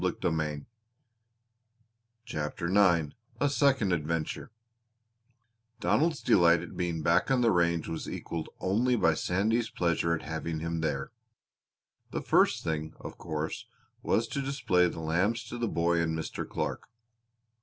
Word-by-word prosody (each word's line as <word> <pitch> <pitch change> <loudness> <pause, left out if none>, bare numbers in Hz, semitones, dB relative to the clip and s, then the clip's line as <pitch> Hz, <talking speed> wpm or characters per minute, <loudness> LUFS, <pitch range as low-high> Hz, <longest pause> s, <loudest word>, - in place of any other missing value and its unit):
CHAPTER 75 -1 -4
IX 85 -7 +4 0.3
A 145 - +3
SECOND 135 -9 +3
ADVENTURE 80 -1 -2 1.3
Donald's 160 +8 +1
delight 85 -2 +5
at 90 - -9
being 85 -3 -2
back 85 - +3
on 130 -2 +3
the 115 -2 +4
range 85 -2 +1
was 80 -1 -4
equaled 80 -1 -5
only 120 +7 +2
by 85 -8 +3
Sandy's 110 +8 0
pleasure 85 -1 +1
at - - -7
having 80 0 -4
him 85 +1 -3
there. 80 -2 -2 1.0
The - - -3
first - - +3
thing, 80 -1 -3
of - - -9
course, 80 -1 -4 0.3
was 115 +1 +1
to 140 - -2
display 95 -10 +2
the 80 - -5
lambs 95 +8 0
to 120 - -6
the 120 - 0
boy 85 -2 +1
and 80 -1 -1
Mr. 80 - -5
Clark. - - -3
85 Hz, 135 wpm, -29 LUFS, 80-110 Hz, 1.3 s, delight